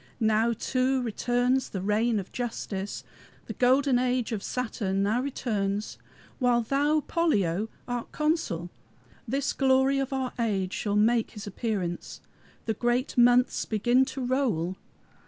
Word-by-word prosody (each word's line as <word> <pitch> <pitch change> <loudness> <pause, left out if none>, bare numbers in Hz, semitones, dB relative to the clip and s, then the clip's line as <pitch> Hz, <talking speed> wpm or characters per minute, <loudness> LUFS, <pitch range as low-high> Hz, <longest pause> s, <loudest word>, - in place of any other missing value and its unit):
Now, 220 0 +3
too, 260 +3 0
returns 245 +3 0
the 195 - -4
reign 215 +3 +1
of 195 -2 -5
Justice. 210 -5 -4 0.4
The - - -6
golden 260 +1 +3
age 250 -1 0
of 215 -3 -2
Saturn 205 -5 -2
now 220 +5 +1
returns. 210 -6 -2 0.4
While 245 -2 +3
thou, 290 +6 +1
Pollio, 215 - +1 0.2
art 245 -1 -4
consul, 300 - -1 0.6
This 275 +4 -1
glory 265 0 +3
of 270 +1 -2
our 265 -2 -2
age 195 -5 0
shall 205 -1 -1
make 225 +2 +3
his 205 - -6
appearance. 200 -4 -3 0.5
The 225 - 0
great 240 +4 0
months 245 +1 +4
begin 240 +4 +3
to 260 -1 -5
roll. 230 - 0
240 Hz, 135 wpm, -27 LUFS, 210-260 Hz, 0.6 s, months